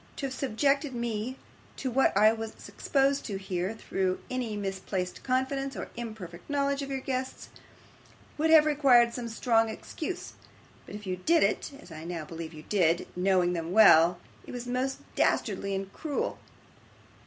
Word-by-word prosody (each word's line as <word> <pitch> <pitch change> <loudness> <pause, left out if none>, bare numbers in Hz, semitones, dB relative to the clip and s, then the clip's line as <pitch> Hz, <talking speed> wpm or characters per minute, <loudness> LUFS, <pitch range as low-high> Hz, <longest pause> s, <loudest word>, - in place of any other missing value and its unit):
To 275 - -4
have 265 - -3
subjected 275 +2 0
me 235 +1 -3 0.4
to 260 - -3
what 265 -5 +3
I 215 +2 +6
was 225 -1 -7
exposed 275 0 +1
to 200 -4 -3
here, 190 +1 -3
through 190 -4 -1
any 245 -4 -2
misplaced 190 -2 -3
confidence 270 +1 -1
or - - -6
imperfect 215 - -8
knowledge 280 0 0
of 275 - -5
your 270 -1 -3
guests, 260 0 -4 0.9
would 315 +2 +1
have 315 -1 +8
required 265 -6 +5
some 235 -1 -4
strong 225 0 +2
excuse; 325 +10 -6 0.5
but - - -8
if 210 0 -8
you 185 -1 -2
did 325 - +3
it - - 0
as 240 - -14
I 155 0 -8
now 170 -2 -5
believe 165 0 -7
you 155 -2 -11
did 175 -4 +1
knowing 180 -1 +2
them 165 0 -3
well, 175 -5 +7 0.3
it - - -8
was 245 0 -5
most 255 +2 -2
dastardly 200 -2 +1
and 195 0 -5
cruel. 305 -3 -3
225 Hz, 165 wpm, -29 LUFS, 190-270 Hz, 0.9 s, have